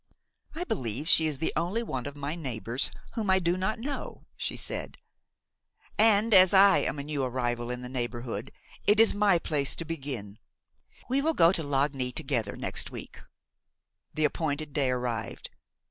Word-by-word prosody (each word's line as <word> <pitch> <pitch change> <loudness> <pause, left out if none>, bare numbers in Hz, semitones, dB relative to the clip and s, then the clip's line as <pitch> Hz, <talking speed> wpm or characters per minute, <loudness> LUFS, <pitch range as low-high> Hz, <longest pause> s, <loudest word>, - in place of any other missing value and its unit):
"I 340 - -3
believe 130 - -2
she 160 -1 +6
is 150 -3 -3
the 160 - -1
only 180 +8 -1
one 130 - -4
of 145 - -7
my 145 +1 -4
neighbors 125 -5 -2 0.2
whom 220 -4 -2
I 190 - +5
do 175 -1 +1
not 190 +5 -1
know," 275 +5 -6
she - - -3
said; - - -4 1.0
"and 220 +1 +4
as 185 0 +7
I 195 0 +7
am - - -2
a 140 - -4
new 145 -2 -2
arrival 120 -1 -2
in 125 0 -4
the 125 - -6
neighborhood 120 -1 -4 0.4
it 210 +1 +5
is 225 - +6
my 205 -3 +3
place 150 -4 0
to 165 - -5
begin. 135 -10 -5 0.7
We 265 +2 +1
will 320 +2 0
go 165 0 +6
to 180 - 0
Lagny 140 -3 0
together 120 -5 -2
next - - -1
week." - - -9 1.0
The 155 - +2
appointed 150 -1 -2
day 140 -4 +1
arrived. 125 -3 -3
150 Hz, 170 wpm, -28 LUFS, 125-190 Hz, 1.0 s, as